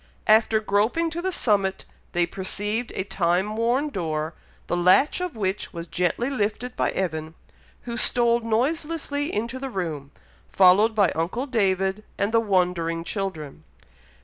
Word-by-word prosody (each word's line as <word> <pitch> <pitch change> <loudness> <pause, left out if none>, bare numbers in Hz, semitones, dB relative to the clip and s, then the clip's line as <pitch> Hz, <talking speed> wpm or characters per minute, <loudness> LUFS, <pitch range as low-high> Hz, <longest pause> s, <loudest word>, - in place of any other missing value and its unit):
After 220 0 +4
groping 220 +11 +1
to 340 +1 -4
the 375 +1 -1
summit, 200 - 0 0.3
they 175 -1 +3
perceived 205 +6 -3
a 190 - -1
time 190 +2 0
worn 245 +6 +1
door, 160 - -3 0.3
the - - -1
latch 185 - +4
of 360 -6 -3
which 195 -2 -2
was 170 -1 -6
gently 180 +8 -1
lifted 250 -1 -2
by - - +1
Evan, 160 -3 -3 0.5
who 235 -1 -5
stole 235 -1 +2
noiselessly 290 +5 -1
into 235 +4 -3
the 270 0 -4
room, 160 - -4 0.4
followed 195 +4 +5
by 200 -5 +4
uncle 175 - -2
David 195 -5 0
and 200 +2 0
the 230 - +4
wondering 180 -5 0
children. 170 -7 -5
205 Hz, 145 wpm, -24 LUFS, 180-240 Hz, 0.5 s, followed